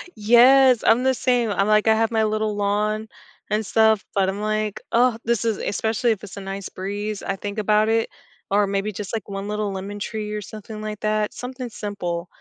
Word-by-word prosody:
Yes, 245 +3 +6
I'm 245 +3 +4
the 265 - +3
same, 245 -2 +1
I'm, 195 0 +1
like, 215 0 +3
I 220 - +6
have 225 +1 +1
my 220 -1 +2
little 215 0 -1
lawn 210 +2 0 0.4
and 215 +1 0
stuff, 220 0 +3
but 195 -1 +2
I'm, 200 +2 -4
like, 215 -1 -2
"Oh, 240 -1 +3
this 235 -2 +1
is" 225 -3 +1
especially 220 +3 0
if 215 - -3
it's 205 - -9
a - - -5
nice 195 0 -5
breeze, 205 +2 -4
I 195 - -2
think 205 +2 -6
about 215 0 +2
it, 225 0 +1 0.4
or 200 0 +3
maybe 200 +2 -1
just, 205 +1 -7
like, 220 -4 -3
one 195 0 -5
little 210 -1 -2
lemon 195 +2 -6
tree 210 0 -4
or 210 - -3
something 215 +1 -9
like 215 -1 -5
that- 215 0 0
something 250 0 -6
simple. 185 -6 -4
215 Hz, 210 wpm, -23 LUFS, 200-225 Hz, 0.4 s, Yes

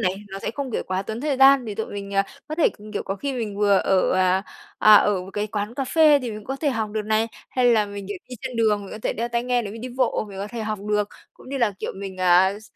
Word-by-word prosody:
này, 185 0 +1
nó 195 0 -6
sẽ - - -3
không, 280 -2 -4
kiểu, - - -1
quá 185 +1 -1
tốn 220 +3 -5
thời 285 -1 0
gian 270 -1 +6
để 210 -3 -5
tụi 220 - -3
mình, 200 -1 -6
ờ, 195 - +4 0.3
có 310 - -3
thể 320 - +4
c - - -10 0.2
kiểu, 205 - -2
có 195 - -3
khi 280 +7 -3
mình 225 -5 -4
vừa 205 -1 +4
ở, 190 -1 +2
à, 185 0 +2 0.4
à, 215 - +8
ở 205 -2 +3
một 185 - -10
cái 210 +1 -2
quán 210 +2 -4
cà 270 - -2
phê 305 +1 +5
thì 250 -4 -5
mình 210 - -6
cũng 210 - -14
có 270 - -3
thể 290 +1 0
học 220 -4 -2
được 215 0 -2
này, 220 +1 +2 0.2
hay 255 - 0
là 225 -4 +4
mình, 200 -1 -7
kiểu, 205 - -4
đi 255 - -7
trên 250 - -5
đường, 215 -2 +2
mình 195 - -10
có - - -7
thể - - 0
đeo 235 +2 -3
tai 235 0 -1
nghe 245 -1 +1
nếu 205 - -6
mình 225 - -8
đi 255 - -4
bộ 255 -4 +1
mình 195 -1 -9
có 200 - -3
thể 235 +1 -6
học 215 -1 -3
được. 210 -1 +1 0.2
Cũng - - -16
như 275 +1 -3
là, 235 -5 +2
kiểu, - - -4
mình, 195 -1 -7
à, 185 +2 +4
s - - -17
215 Hz, 315 wpm, -23 LUFS, 200-250 Hz, 0.4 s, à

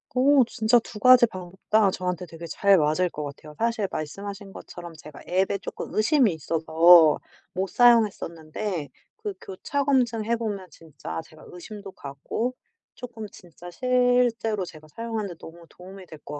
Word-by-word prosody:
어. 270 +1 +5
진짜 235 0 +2
2 220 -1 -11
가지 255 +2 +7
방법 185 -4 -9
다 215 -2 +4
저한테 180 -1 -3
되게 165 +1 -10
잘 200 +3 +3
맞을 155 +3 +1
것 150 - -6
같아요. 150 +1 -10
사실 230 -3 0
말씀하신 195 +5 -6
것처럼 170 -1 -10
제가 150 -2 -13
앱에 190 +2 +1
조금 - - -7
의심이 225 - +3
있어서 160 +1 +5 0.4
못 190 +1 -2
사용했었는데 195 - +1 0.3
그 430 -3 -5
교차 280 +9 -3
검증해 235 -5 +1
보면 210 -5 -4
진짜 145 - -8
제가 155 - -17
의심도 200 +3 -10
가고 145 - -4 0.4
조금 230 -3 -8
진짜 175 0 -13
실제로 245 -3 +1
제가 155 -3 -13
사용하는 225 +3 -5
데 175 - -8
너무 170 +1 -12
도움이 190 +1 -13
될 155 -3 -13
것 145 0 -7
195 Hz, 315 characters per minute, -25 LUFS, 165-230 Hz, 0.4 s, 가지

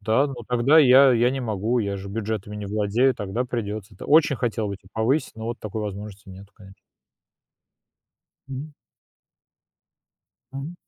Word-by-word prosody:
Да, 110 +7 +2
но 140 - -6
тогда 125 +6 +4
я 135 -1 +7
я 120 +1 +3
не 135 +1 -3
могу, 110 +1 -1
я 100 -3 -2
же 100 0 -8
бюджетами 105 0 -4
не 105 -1 -6
владею, 105 +6 +1
тогда 105 +5 -3
придётся. 110 -4 -5
Т - - -10
очень 155 -1 +4
хотел 115 -3 -2
бы 100 - -4
те 95 - -22
повысить, 120 +7 0
но 110 - -7
вот 120 +2 -5
такой 110 +1 -5
возможности 105 0 -7
нету, 95 +2 -12
конечно. 95 -1 -15 1.7
Мгм. 135 +3 -7 1.8
Мгм. 140 +5 -6
110 Hz, 155 wpm, -24 LUFS, 100-130 Hz, 1.8 s, я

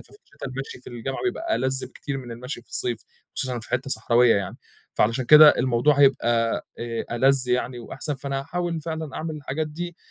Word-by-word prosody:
ففي - - -15
الشِّتا 415 - -11
المشي 130 -1 -7
في - - -14
الجامعة 120 +3 -5
بيبقى 335 -3 -1
ألَذ 130 0 -1
بكتير 140 -1 -6
من 125 -2 -9
المشي 125 +2 -6
في - - -28
الصيف 120 -2 -1 0.3
وخصوصًا 125 -3 -2
في - - -6
حِتّه 130 +2 -2
صحراوية 120 -2 +4
يعني، 100 - -3 0.4
فعلشان 115 +4 +1
كده 150 +2 +9
الموضوع 130 +3 +3
هيبقى 120 -4 +3
آآ 115 -1 -4
ألَذ 130 0 +3
يعني 125 0 0
وأحسن، 145 +5 -4
فأنا 135 0 -3
هاحاول 170 +2 -3
فعلًا 160 -2 -5
أعمِل 160 -1 -4
الحاجات 150 +1 -3
دي 175 +3 -6
135 Hz, 185 wpm, -24 LUFS, 120-150 Hz, 0.4 s, كده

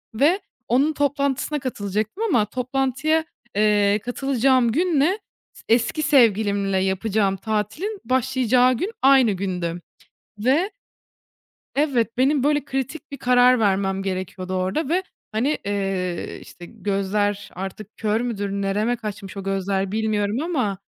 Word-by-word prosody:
ve 310 - +3 0.3
onun 275 +6 +2
toplantısına 285 +1 0
katılacaktım 215 - -3
ama 245 - +3
toplantıya, 270 +6 0 0.3
eee, 210 0 +3
katılacağım 255 -1 +2
günle 340 - +2 0.3
s - - -16
eski 235 +6 +2
sevgilimle 205 -8 +3
yapacağım 195 +1 +1
tatilin 220 - -3
başlayacağı 255 0 +3
gün 395 - -2
aynı 265 -5 +6
gündü. 180 -3 -3 0.6
Ve 285 - +2 1.0
Evet, 255 -5 0
benim 270 +1 +3
böyle 295 0 +2
kritik 270 +3 -4
bir - - -4
karar 250 -1 +4
vermem 195 -1 +1
gerekiyordu 185 -1 -4
orada 190 - -1
ve, 355 +4 +1 0.3
hani, 260 +8 0
eee, 195 -3 -2
işte, 175 - -12
gözler 205 0 -1
artık 195 +3 -7
kör 215 +1 0
müdür? 205 -5 -2
Nereme 200 +4 0
kaçmış 210 -3 -7
o 195 - -4
gözler, 195 0 -1
bilmiyorum 215 -1 0
ama 255 - -1
225 Hz, 120 wpm, -23 LUFS, 200-270 Hz, 1.0 s, aynı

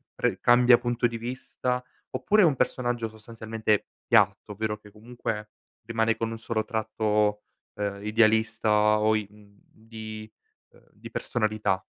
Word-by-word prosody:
pre - - 0
cambia 120 0 +6
punto 120 0 0
di 115 0 -5
vista? 125 +1 -3 0.3
Oppure 215 +1 +3
è - - +7
un 155 -5 +3
personaggio, 120 -2 -1
sostanzialmente, 110 -1 -2 0.2
piatto, 105 - +3
ovvero 105 +1 -2
che, 105 -1 -17
comunque, 105 -1 -5 0.4
rimane 115 0 +1
con 115 0 -2
un 115 - -6
solo 115 -1 -2
tratto, 105 -2 0 0.3
ehm, 100 -1 -4
idealista 110 -1 +3
o 110 +1 +3
i 105 -2 -2
mhmm, 100 -1 -20
di 110 -1 -9 0.4
ehm, - - -23
di - - -12
personalità? 110 -4 -1
110 Hz, 140 wpm, -27 LUFS, 105-115 Hz, 0.4 s, è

